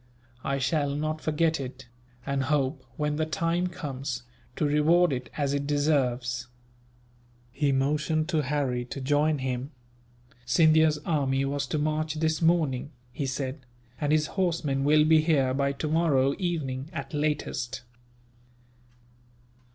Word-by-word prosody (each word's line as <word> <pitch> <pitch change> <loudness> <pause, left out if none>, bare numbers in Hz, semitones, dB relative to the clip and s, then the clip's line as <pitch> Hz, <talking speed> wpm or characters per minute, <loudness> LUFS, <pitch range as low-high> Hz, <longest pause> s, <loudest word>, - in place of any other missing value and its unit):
I 140 - 0
shall 140 +1 0
not 155 +1 -2
forget 160 0 +1
it; 130 -2 -7 0.4
and 140 -1 -1
hope, 135 -2 0
when 150 0 -1
the 155 - +1
time 165 +3 0
comes, 135 -7 -5 0.3
to - - 0
reward 150 +3 +4
it 125 -1 -4
as 140 -2 0
it 140 0 -1
deserves." 125 -5 0 1.0
He 140 +2 +1
motioned 150 +3 +1
to 160 -4 +2
Harry 135 -3 -1
to 130 - -6
join 145 +3 +2
him. 130 0 -3 0.7
"Scindia's 155 +4 +4
army 135 -4 +1
was 140 0 -2
to 155 - -1
march 155 +1 -1
this 160 0 0
morning," 155 -6 +2 0.2
he 140 - -2
said, 130 +2 -3 0.4
"and 145 -1 0
his 155 0 +3
horsemen 165 -7 -1
will 150 +1 +5
be 155 0 +5
here 140 -5 +2
by 140 +1 +1
tomorrow 145 -2 +2
evening, 150 -7 -2
at 165 - -6
latest." 145 -5 -2
145 Hz, 135 wpm, -27 LUFS, 135-155 Hz, 1.0 s, will